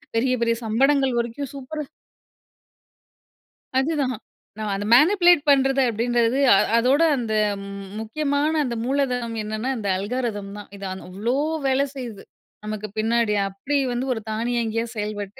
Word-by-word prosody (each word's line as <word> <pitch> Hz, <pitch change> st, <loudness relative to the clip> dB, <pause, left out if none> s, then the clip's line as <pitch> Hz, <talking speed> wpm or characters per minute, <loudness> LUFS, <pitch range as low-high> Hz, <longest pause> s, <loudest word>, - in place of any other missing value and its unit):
பெரிய 255 Hz, +3 st, +2 dB
பெரிய 230 Hz, 0 st, +2 dB
சம்படங்கள் 270 Hz, +4 st, +2 dB
வரைக்கும் 235 Hz, +3 st, -3 dB
சூப்பரா 295 Hz, +3 st, -5 dB, 1.9 s
அதுதான். 270 Hz, -2 st, 0 dB, 0.4 s
நான் 215 Hz, -2 st, -3 dB
அத 195 Hz, -, -3 dB
மேனிபுலேட் 350 Hz, +3 st, +6 dB
பண்றது 270 Hz, -1 st, +4 dB
அப்படின்றது 235 Hz, +2 st, +1 dB, 0.2 s
அ -, -, +7 dB, 0.2 s
அதோட 260 Hz, +6 st, +3 dB
அந்த 230 Hz, -4 st, -2 dB, 0.7 s
முக்கியமான 285 Hz, +6 st, 0 dB
அந்த 245 Hz, -4 st, -3 dB
மூலதனம் 250 Hz, -4 st, -1 dB
என்னென்னா 215 Hz, +4 st, -3 dB
அந்த 210 Hz, -3 st, -4 dB
அல்காரிதம் 205 Hz, -1 st, -3 dB
தான். 205 Hz, -, -10 dB
இது 200 Hz, 0 st, -8 dB
ஆன் 190 Hz, -, -7 dB
அவ்வளோ 215 Hz, +7 st, -1 dB, 0.3 s
வேலை 270 Hz, +1 st, +2 dB
செய்யுது, 235 Hz, -6 st, -7 dB, 0.4 s
நமக்கு 215 Hz, 0 st, -4 dB
பின்னாடி 225 Hz, -1 st, +2 dB
அப்படி 230 Hz, +10 st, -2 dB, 0.2 s
வந்து 255 Hz, +2 st, -2 dB
ஒரு 225 Hz, -, -5 dB
தானியங்கியா 230 Hz, 0 st, -1 dB
செயல்பட்டு 205 Hz, -1 st, -5 dB
240 Hz, 130 wpm, -23 LUFS, 215-270 Hz, 1.9 s, அ